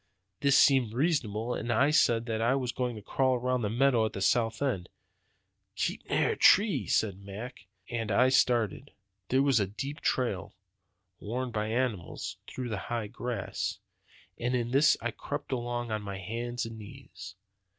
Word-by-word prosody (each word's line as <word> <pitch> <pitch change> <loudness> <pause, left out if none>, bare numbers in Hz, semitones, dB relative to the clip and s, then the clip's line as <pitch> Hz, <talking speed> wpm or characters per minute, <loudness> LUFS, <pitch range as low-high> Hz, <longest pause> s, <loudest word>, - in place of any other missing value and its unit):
This 140 -1 +4
seemed 130 -6 +4
reasonable; 125 -6 0
and 120 0 -3
I 140 +6 +3
said 115 -7 +3
that 110 -2 -2
I 120 +4 +3
was 125 -3 -1
going 125 -2 -2
to 105 - -9
crawl 130 +4 +1
around 125 0 0
the 105 - -1
meadow 120 -1 +3
to - - -19
the - - -5
south 115 +2 +1
end. 100 -11 -1 0.9
'Keep - - -3
near - - +2
a - - -2
tree,' 190 - +4
says 105 -3 +2
Mac; 100 +3 -9 0.2
and 115 -3 -3
I 125 +6 +4
started. 125 +1 +1 0.4
"There 130 +2 +3
was 135 -5 +3
a 100 - +1
deep 135 - -6
trail, 100 -9 -1 0.6
worn 125 +4 -3
by 105 -1 -2
animals, 115 -5 -2
through 125 -1 -5
the 105 -3 -3
high 115 -3 -2
grass; 120 +1 -3 0.6
and 125 +1 0
in 120 -1 -1
this 140 +2 +5
I 120 - -1
crept 145 +5 -6
along 120 -2 -2
on 110 -1 -1
my 100 -1 -5
hands 115 +5 -4
and 115 -1 -8
knees. 105 -1 -11
120 Hz, 170 wpm, -29 LUFS, 110-130 Hz, 0.9 s, this